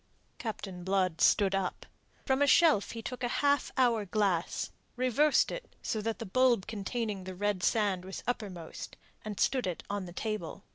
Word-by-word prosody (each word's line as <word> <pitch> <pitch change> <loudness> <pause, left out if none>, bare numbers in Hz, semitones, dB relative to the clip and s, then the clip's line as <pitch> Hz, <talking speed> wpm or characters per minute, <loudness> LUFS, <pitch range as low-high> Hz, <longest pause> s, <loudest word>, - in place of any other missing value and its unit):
Captain 195 -5 -5
Blood 185 -3 +1
stood 195 -2 +4
up. 195 -1 -2 0.4
From 265 +1 +2
a 285 - +5
shelf 305 -8 +5
he 230 -1 -6
took 250 +1 -5
a - - +2 0.2
half 285 -1 +3
hour 240 -4 +3
glass, 195 -4 0 0.2
reversed 255 +4 +3
it - - -7
so 215 - -1
that 225 +1 -2
the 230 - -6
bulb 240 0 +3
containing 210 -1 -3
the 185 0 -7
red 205 0 0
sand 200 -3 +1
was 190 +1 -7
uppermost, 195 -9 -5 0.3
and 210 -2 -6
stood 255 -6 +2
it 180 - -4
on 205 -2 -2
the 175 - -9
table. 205 -2 -4
210 Hz, 175 wpm, -31 LUFS, 190-245 Hz, 0.4 s, a